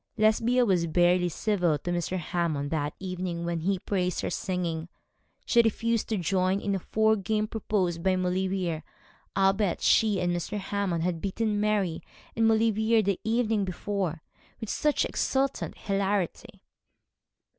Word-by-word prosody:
Lesbia 230 +3 +3
was 180 -5 +2
barely 175 +2 +3
civil 175 -3 +1
to 175 +5 -4
Mr. 175 +1 -1
Hammond 160 -4 -2
that 150 -2 -1
evening 180 -2 -4
when 170 -1 -1
he 190 +4 0
praised 180 -1 -1
her - - -3
singing; 180 -4 -2
and 165 +2 -9 0.6
she 235 - +5
refused 230 0 0
to 220 - 0
join 185 +2 +1
in 200 0 -2
a 195 - 0
four 220 +4 +2
game 215 +1 -1
proposed 195 -6 -1
by 190 +1 +2
Maulevrier, 185 -2 -1 0.6
albeit 195 0 +2
she 210 -3 +3
and 175 0 0
Mr. 175 +5 -3
Hammond 195 -4 -2
had 170 -2 -1
beaten 210 +1 -1
Mary 205 -6 0 0.3
and 225 0 +3
Maulevrier 220 0 +3
the 200 -2 0
evening 225 -2 +1
before, 185 -3 -3 0.4
with 220 -3 -3
much 300 -1 +3
exultant 270 0 -1
hilarity. 195 -2 -2
190 Hz, 145 wpm, -27 LUFS, 175-215 Hz, 0.6 s, she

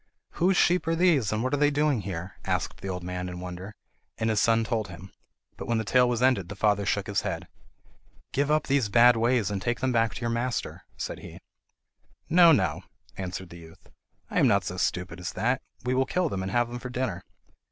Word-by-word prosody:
"Whose 185 +2 +2
sheep 180 -1 +3
are 165 - +2
these, 165 - +3
and 110 +1 -1
what 130 - -1
are - - +3
they 145 +1 +4
doing 145 -4 +1
here?" 90 -2 -6
asked - - -2
the - - -5
old 90 -1 -4
man 90 0 -4
in 90 0 -7
wonder, 90 +3 -7 0.4
and 110 0 0
his 105 - +2
son 115 0 +3
told 110 -1 -2
him. 90 +1 -11 0.5
But - - -7
when 115 - +1
the 110 - 0
tale 125 +4 +3
was 120 0 0
ended 115 -9 +2
the 105 - -6
father 105 -1 +1
shook 100 -1 0
his 100 -1 -1
head. - - -4 0.9
"Give 140 +1 +1
up 155 0 +2
these 135 -6 +1
bad 120 +3 +6
ways 115 -2 +1
and 100 -2 -3
take 120 +4 -1
them 130 - 0
back 115 -2 +1
to - - -7
your 115 -1 -1
master," 120 +1 -3
said - - -5
he. - - -11 0.9
"No, 170 0 +7
no," 150 - +2 0.3
answered 95 -1 -5
the 85 - -10
youth; 80 0 -16 0.4
"I - - +1
am - - +5
not - - +3
so - - -5
stupid 90 -1 -2
as 90 - -5
that! 125 +2 0 0.2
We 125 +1 0
will 130 +1 +1
kill 180 +1 0
them 95 - -3
and 95 0 -3
have 120 +1 +2
them 120 0 -6
for 125 - -7
dinner." 125 -8 -3
115 Hz, 225 wpm, -27 LUFS, 95-130 Hz, 0.9 s, No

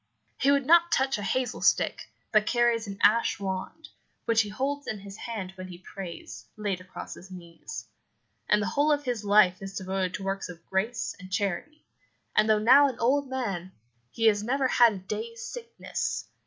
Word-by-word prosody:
He 275 - +3
would 280 -1 +3
not 340 +3 +5
touch 265 -3 +2
a - - -4
hazel 250 +5 -1
stick, - - +2 0.2
but 215 -1 +3
carries 240 -2 +2
an 200 -1 -6
ash 230 0 +4
wand, 190 +10 -5 0.4
which 225 -1 +4
he 210 - -4
holds 275 +6 -3
in 215 - -3
his 200 0 -10
hand 210 -4 -5
when 185 -1 -8
he 180 -1 -9
prays, 185 -1 -9
laid 200 -4 -2
across 185 - -8
his 185 - -13
knees; 170 -9 -9 0.6
and 210 0 +4
the - - -1
whole 295 +1 +2
of 290 -1 +1
his 245 -5 -2
life 200 -3 +4
is 195 0 -6
devoted 190 -1 -2
to 195 - -6
works 195 0 -3
of 170 -2 -11
grace 200 +5 -2
and 185 +1 -11
charity, 200 - -3 0.5
and 215 +1 +4
though 215 - +5
now 260 +7 +7
an 260 - -4
old 270 +3 +1
man, 195 -9 -3 0.4
he 225 - -2
has 210 -2 +5
never 260 +4 +1
had 240 -3 +5
a - - -6
day's 460 - -6
sickness. 465 -1 -4
215 Hz, 190 wpm, -27 LUFS, 190-260 Hz, 0.6 s, now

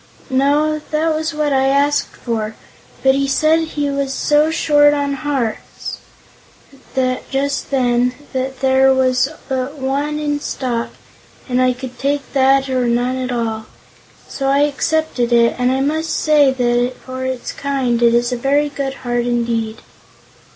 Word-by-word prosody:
"No; 295 +3 +2
that 315 +1 +1
was 315 +1 -2
what 300 -2 -1
I 265 0 +2
asked 285 +1 +2
for, 220 -2 -3 0.5
but 265 0 +5
he 275 0 0
said 310 +4 +3
he 310 -3 -2
was 275 -1 -2
so 295 +3 +2
short 295 -2 +4
on 285 -1 -1
hearts, 270 -4 -4 1.3
just 280 +1 -1
then, 250 -2 +1 0.2
that 260 0 -3
there 265 0 +4
was 255 0 +2 0.2
but 265 +2 -3
one 280 +3 -1
in 295 -1 -1
stock, 245 -5 -3 0.6
and 250 -1 +1
I 255 0 +3
could 255 0 -9
take 280 +1 -2
that 270 0 +3
or 255 -2 0
none 245 +2 +1
at 255 -1 -3
all. 225 -2 -3 0.6
So 270 - -3
I 275 +1 +3
accepted 295 -3 0
it, 235 -1 +4
and 250 0 +2
I 265 +1 0
must 315 +3 -1
say 300 -3 +3
that 245 -1 +1
for 260 0 -5
its 260 -1 -3
kind 265 -4 -1
it 235 0 +4
is 240 +1 +1
a 250 - -1
very 285 +4 +1
good 275 -1 -4
heart 240 0 0
indeed." 230 -2 -1
265 Hz, 155 wpm, -18 LUFS, 250-290 Hz, 1.3 s, but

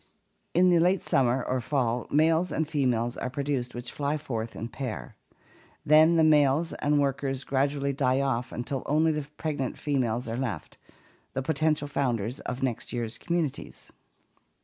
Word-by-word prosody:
In 180 +1 +5
late 175 +2 +3
summer 125 -1 +2
or 130 0 -1
fall 125 -3 -1
males 160 +4 +3
and 160 - -1
females 125 -6 0
are - - -3
pro 140 +2 -3
duced 135 -4 -2
which 120 0 -6
fly 145 +1 -1
forth 115 -6 -4
and 115 +2 -6
pair. 130 -6 -5 0.7
Then 155 +3 +6
the 165 - +4
males 150 +1 +4
and 145 0 +1
workers 135 -1 -1
gradually 140 +1 0
die 130 -1 +1
off 130 -3 -1
until 125 +3 -3
only 155 +2 +3
the 150 -2 -3
pregnant 145 -5 -3
females 125 -5 -1
are 115 - -3
left 120 -12 -4 0.3
— - - -33
the 135 - -1
potential 155 0 +1
founders 125 -4 -1
of 125 +1 -5
next 125 -4 -2
year's 115 -1 -4
communities. 145 - -3
140 Hz, 160 wpm, -27 LUFS, 125-150 Hz, 0.7 s, Then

